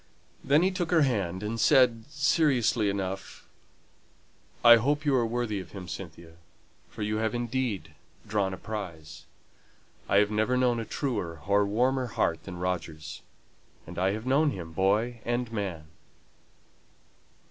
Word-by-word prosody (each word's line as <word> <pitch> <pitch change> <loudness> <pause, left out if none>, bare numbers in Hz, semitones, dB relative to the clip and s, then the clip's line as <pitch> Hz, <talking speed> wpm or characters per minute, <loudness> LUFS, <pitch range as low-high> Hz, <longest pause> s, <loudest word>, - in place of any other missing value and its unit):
Then 145 +4 +4
he 190 - +3
took 180 -3 -2
her 165 -4 +4
hand, 100 -8 -1
and 115 +2 -3
said, 115 -1 +4
seriously 140 -7 +2
enough, 95 -1 -5 1.2
"I 120 0 +10
hope 145 +6 0
you 145 - +3
are 120 -3 +2
worthy 115 -3 -2
of 90 -3 -10
him, 95 -3 -8
Cynthia, 85 -1 -9 0.5
for - - -6
you 105 +1 -1
have 110 +2 -1
indeed 120 -9 -2 0.3
drawn 100 -2 0
a 95 - -5
prize. 85 -8 -7 0.8
I 100 - +4
have 105 +1 +4
never 110 +4 +1
known 125 -2 +2
a 115 - -4
truer 90 - -3
or 100 0 +3
warmer 125 +5 +1
heart 85 -7 -1
than 95 -2 -7
Roger's; 85 -3 -4 0.6
and 85 +1 -7
I 95 +2 +2
have 110 +2 -5
known 145 +4 +3
him 85 -10 -6
boy 110 +7 +1
and 120 0 -2
man." 95 -8 -4
110 Hz, 145 wpm, -28 LUFS, 95-125 Hz, 1.2 s, I